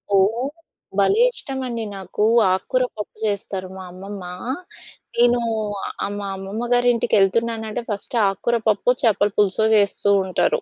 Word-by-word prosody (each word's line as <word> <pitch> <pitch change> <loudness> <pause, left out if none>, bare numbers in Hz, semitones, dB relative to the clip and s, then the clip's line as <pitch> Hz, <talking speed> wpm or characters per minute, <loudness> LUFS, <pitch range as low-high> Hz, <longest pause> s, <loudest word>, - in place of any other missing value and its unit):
ఓహ్! 225 +8 +2 0.5
భలే 405 - +4
ఇష్టం 270 -1 -4
అండి 230 -2 -3
నాకు. 190 +2 -2 0.3
ఆకుకూర 220 +7 +1
పప్పు 210 - -6
చేస్తారు 195 -2 -2
మా 190 - -7
అమ్మమ్మా, 185 -1 -8 0.8
నేనూ 240 0 +4 0.7
ఆహ్, 205 - -5
మా 200 - -4
అమ్మమ్మగారి 235 +6 0
ఇంటికెళ్తున్నానంటే, 220 +2 +1
ఫస్ట్ 210 +3 -3
ఆకుకూర 230 +5 0
పప్పు, 215 +4 +3
చేపలు 205 -2 +3
పులుసో, 210 +1 +3
చేస్తూంటారు. 200 -2 +2
210 Hz, 120 wpm, -22 LUFS, 195-235 Hz, 0.8 s, భలే